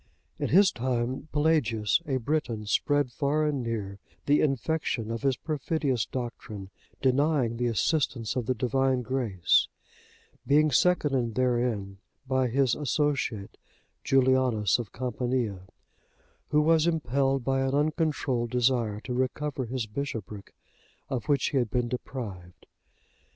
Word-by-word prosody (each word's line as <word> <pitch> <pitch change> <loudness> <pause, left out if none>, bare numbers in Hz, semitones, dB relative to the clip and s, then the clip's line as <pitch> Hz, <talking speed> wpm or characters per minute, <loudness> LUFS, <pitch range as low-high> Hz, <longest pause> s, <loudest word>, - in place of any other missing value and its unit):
In - - -1
his 190 +3 +6
time, 125 +3 -2
Pelagius,(64) 145 -2 +1
a - - 0
Briton, 120 -5 -2
spread 145 +4 +1
far 150 +4 0
and 145 -3 0
near 105 -4 -4 0.3
the 145 +1 +4
infection 135 -4 -1
of 115 - -3
his 135 -3 +1
perfidious 145 -5 -1
doctrine, 110 -5 -6 0.3
denying 130 -3 +2
the 120 0 0
assistance 120 -1 0
of 125 -3 -2
the 130 - +1
Divine 130 +2 +1
grace, 115 -8 +2 0.8
being 150 +2 +4
seconded 135 -7 +2
therein 120 -6 0 0.3
by 130 -1 +2
his 130 0 +2
associate 140 -7 -1 0.5
Julianus 130 -6 +3
of 115 -4 -6
Campania,(65) 120 -6 -2 0.8
who 150 +1 +3
was 165 +1 +4
impelled 135 -4 +1
by 135 +1 +1
an 135 +1 0
uncontrolled 145 -5 0
desire 120 -4 +1
to 125 - -5
recover 130 +2 -2
his 125 0 -3
bishopric, 105 -4 -6 0.5
of 125 -6 -3
which 145 -1 +2
he 140 - -1
had 120 -3 0
been 120 +2 0
deprived. 105 -8 -7
130 Hz, 125 wpm, -28 LUFS, 115-140 Hz, 0.8 s, his